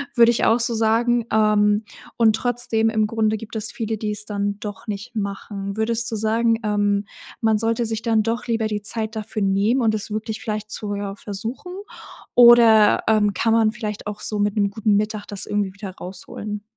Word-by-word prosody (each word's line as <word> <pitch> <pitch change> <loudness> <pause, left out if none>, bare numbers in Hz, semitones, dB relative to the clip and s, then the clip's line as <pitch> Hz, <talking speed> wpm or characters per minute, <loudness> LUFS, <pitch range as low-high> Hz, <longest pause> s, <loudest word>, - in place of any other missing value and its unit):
würde 235 -1 +6
ich 235 - -1
auch 230 +2 +4
so 235 0 +3
sagen. 230 +1 +2
Ähm, 210 0 +3 0.3
und 220 -2 +4
trotzdem 240 -2 +1
im 220 -1 +1
Grunde 220 0 0
gibt 225 +1 -10
es 220 0 -2
viele, 220 -1 -3
die 210 -1 -2
es 210 0 -3
dann 205 -1 -3
doch 210 +1 -8
nicht 210 +4 -6
machen. 200 -1 -5
Würdest 230 +1 0
du - - -2
sagen, 225 +1 +1
ähm, 205 -1 +1 0.4
man 220 -2 +2
sollte 230 +1 0
sich 225 0 -2
dann 225 -2 +2
doch 230 +2 -3
lieber 225 -1 0
die 210 -1 -3
Zeit 220 +1 -3
dafür 215 0 -4
nehmen 215 +7 +2
und 220 -2 +2
es 210 0 -5
wirklich 220 +1 -4
vielleicht 215 -1 -4
zu 205 -1 -4
ja, 200 -1 -4
versuchen 225 - -6 0.6
oder, 235 -3 +7
ähm, 210 -2 +3
kann 225 +5 0
man 225 -1 +3
vielleicht 210 -2 -5
auch 210 0 -5
so 210 - -2
mit 205 +1 0
'nem 200 -1 +2
guten 210 0 +1
Mittag 210 0 -1
das 200 -2 -4
irgendwie 205 -2 -2
wieder 200 -1 -8
rausholen? 205 +3 -7
215 Hz, 195 wpm, -22 LUFS, 205-225 Hz, 0.6 s, oder